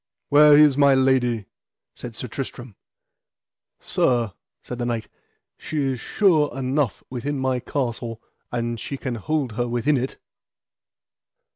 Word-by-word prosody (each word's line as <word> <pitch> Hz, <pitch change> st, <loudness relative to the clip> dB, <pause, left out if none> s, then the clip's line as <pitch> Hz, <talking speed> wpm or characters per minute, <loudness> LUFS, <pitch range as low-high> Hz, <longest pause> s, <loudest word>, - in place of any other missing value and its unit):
Where 150 Hz, 0 st, +7 dB
is 145 Hz, -2 st, +6 dB
my 140 Hz, -1 st, +6 dB
lady? 125 Hz, -5 st, +2 dB, 0.5 s
said 120 Hz, -2 st, -8 dB
Sir 125 Hz, -, -5 dB
Tristram. 125 Hz, -2 st, -6 dB, 1.0 s
Sir, 120 Hz, -6 st, +1 dB, 0.3 s
said 125 Hz, -, -7 dB
the 120 Hz, -, -1 dB
knight, 115 Hz, -3 st, -2 dB, 0.5 s
she 155 Hz, -, -5 dB
is 135 Hz, -3 st, 0 dB
sure 160 Hz, -, +2 dB
enough 135 Hz, -2 st, -1 dB
within 140 Hz, +3 st, -3 dB
my 130 Hz, -1 st, 0 dB
castle, 120 Hz, -3 st, -3 dB, 0.3 s
an 120 Hz, -1 st, -2 dB
she 140 Hz, +5 st, -5 dB
can 130 Hz, -2 st, -4 dB
hold 135 Hz, +3 st, -2 dB
her 120 Hz, +3 st, -2 dB
within 120 Hz, +5 st, +1 dB
it. 130 Hz, +2 st, -3 dB
130 Hz, 130 wpm, -23 LUFS, 120-140 Hz, 1.0 s, Where